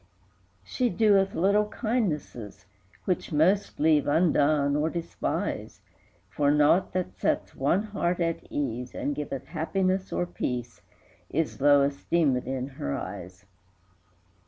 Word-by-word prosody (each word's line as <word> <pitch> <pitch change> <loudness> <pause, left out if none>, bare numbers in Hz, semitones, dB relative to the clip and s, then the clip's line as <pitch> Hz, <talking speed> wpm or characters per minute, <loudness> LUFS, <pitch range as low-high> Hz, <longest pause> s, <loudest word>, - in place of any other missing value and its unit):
IV. - - -28
She 250 -2 0
doeth 195 -1 +3
little 200 +4 +3
kindnesses, 170 - -3 0.4
Which 180 -2 -1
most 175 +7 +2
leave 150 -1 +3
undone, 145 -2 +3
or 150 +2 +1
despise; 170 0 -4 0.5
For 140 +10 0
naught 150 +5 +3
that 185 -1 -2
sets - - -1
one 160 +9 +1
heart 190 -5 -2
at 165 -1 0
ease, 125 -3 -3
And 145 - -2
giveth 135 -3 -5
happiness 185 +5 -1
or 175 - 0
peace, 125 -8 -4 0.5
Is 155 -2 -2
low 145 -1 +5
esteemèd 140 -2 0
in 130 0 -3
her 70 - -1
eyes. 90 +1 -8
155 Hz, 125 wpm, -27 LUFS, 140-185 Hz, 0.5 s, low